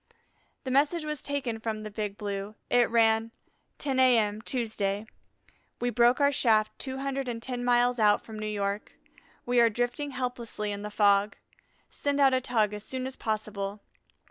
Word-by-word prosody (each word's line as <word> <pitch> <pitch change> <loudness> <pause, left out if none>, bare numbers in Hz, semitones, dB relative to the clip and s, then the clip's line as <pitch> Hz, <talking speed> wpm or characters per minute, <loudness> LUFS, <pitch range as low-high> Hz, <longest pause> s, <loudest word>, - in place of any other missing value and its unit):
The 260 - -4
message 300 +4 +2
was 300 -2 -4
taken 270 -6 -2
from 220 -1 -4
the 215 - -7
Big 205 -1 -4
Blue. 200 0 -4 0.2
It 245 -1 +4
ran: 225 -1 +3 0.5
10 270 -2 -1
A.M., 220 -5 +4
Tuesday. 215 -4 -2 0.7
We 245 0 0
broke 240 +3 +4
our 285 0 +4
shaft 220 -5 +2
two 265 -1 -4
hundred 275 -1 -3
and 235 -2 -3
ten 245 +1 -3
miles 245 0 +3
out 210 -1 +4
from 220 -1 -8
New 215 - -3
York; 205 0 -3 0.5
we 245 0 +2
are 235 -1 +6
drifting 245 +6 -2
helplessly 245 -5 -3
in 200 0 -4
the 210 - -5
fog. 205 -1 +3 0.5
Send 285 0 -2
out 270 -2 +5
a 260 - +2
tug 220 -5 +1
as 210 0 -6
soon 255 +2 -4
as 265 0 -5
possible. 210 -2 -3
230 Hz, 170 wpm, -28 LUFS, 210-255 Hz, 0.7 s, are